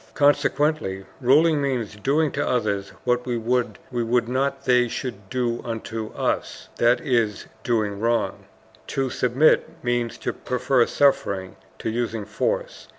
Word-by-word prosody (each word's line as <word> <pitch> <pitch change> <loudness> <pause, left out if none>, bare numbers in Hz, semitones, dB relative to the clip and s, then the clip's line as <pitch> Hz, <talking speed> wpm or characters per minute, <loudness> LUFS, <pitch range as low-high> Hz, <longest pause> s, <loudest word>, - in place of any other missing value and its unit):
Consequently 145 -8 +2
ruling 150 +4 +4
means 125 -7 -2
doing 145 +7 +1
to 145 - -1
others 100 -5 0
what 125 0 +1
we 120 -1 0
would 120 0 -1
not 135 +2 -1
they 125 -1 +4
should 110 -5 -6
do 120 -2 -1
unto 115 -1 -4
us, - - -2
that 120 +1 +4
is, 115 -6 0 0.2
doing 105 -4 0
wrong. 115 +1 0 0.4
To 135 -2 -1
submit 130 +6 +3
means 120 -1 -1
to - - -3
prefer 125 -1 +1
suffering 100 -9 +1 0.2
to - - -3
using 115 -2 -2
force. - - -2
120 Hz, 130 wpm, -24 LUFS, 115-135 Hz, 0.4 s, ruling